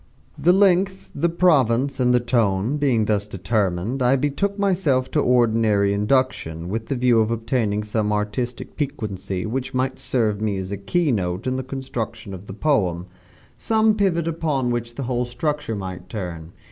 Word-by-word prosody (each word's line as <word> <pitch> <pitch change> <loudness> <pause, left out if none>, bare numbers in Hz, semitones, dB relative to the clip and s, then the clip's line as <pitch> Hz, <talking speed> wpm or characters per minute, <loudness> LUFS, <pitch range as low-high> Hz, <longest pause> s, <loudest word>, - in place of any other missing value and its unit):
The 155 +4 +3
length, 190 0 +2
the 170 - +1
province, 140 -7 +2
and 125 -1 +3
the 125 - +4
tone, 115 0 +1
being 130 -7 +2
thus 105 -1 0
determined, 100 +3 -1
I 125 +2 +4
betook 145 +9 -1
myself 175 -10 +1
to 155 - +1
ordinary 110 -6 +3
induction, 100 -7 0
with 110 +3 -3
the 140 - -1
view 120 -2 +3
of 110 - +1
obtaining 115 -2 -1
some 105 0 -1
artistic 105 +4 -3
piquancy 105 -10 -3
which 125 +4 -3
might 130 +1 -1
serve 110 -5 0
me 105 -3 0
as 95 0 -5
a 100 - -2
key 150 - 0
note 90 -4 -2
in 130 0 0
the 130 - -1
construction 120 -5 -5
of 95 +2 -9
the 95 - -7
poem 95 - +1 0.5
some 220 -1 +2
pivot 185 -6 +1
upon 150 -6 0
which 120 0 -3
the 140 - -4
whole 125 0 -1
structure 145 0 -2
might 95 -3 -7
turn. 85 -6 -6
120 Hz, 170 wpm, -22 LUFS, 105-140 Hz, 0.5 s, the